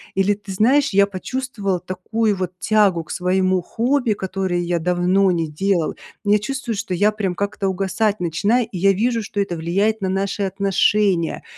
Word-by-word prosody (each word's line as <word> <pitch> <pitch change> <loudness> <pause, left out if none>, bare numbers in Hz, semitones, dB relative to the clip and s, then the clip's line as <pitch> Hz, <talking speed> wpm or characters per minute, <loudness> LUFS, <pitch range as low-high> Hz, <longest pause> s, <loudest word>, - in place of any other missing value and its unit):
Или: 195 +2 +3
"Ты 205 -1 -9
знаешь, 265 +9 +3
я 200 0 +5
почувствовал 200 -1 -3
такую 205 +4 -1
вот 185 -1 -3
тягу 205 -6 +2
к - - -11
своему 185 0 +1
хобби, 245 +4 0
которое 190 -2 -2
я 175 0 -1
давно 180 +3 +2
не 165 -2 -1
делал. 170 +2 -1 0.3
Я 210 +1 +3
чувствую, 240 +1 -4
что 200 -2 -4
я 205 +4 +3
прям 195 -4 -2
как-то 200 0 -2
угасать 200 +3 0
начинаю, 200 +8 +1
и 185 - -5
я 195 +3 +4
вижу, 230 +3 0
что 205 - -5
это 195 -3 -1
влияет 200 +7 0
на 190 - -1
наши 195 +1 -1
отношения". 195 -2 +1
195 Hz, 170 wpm, -20 LUFS, 180-210 Hz, 0.3 s, я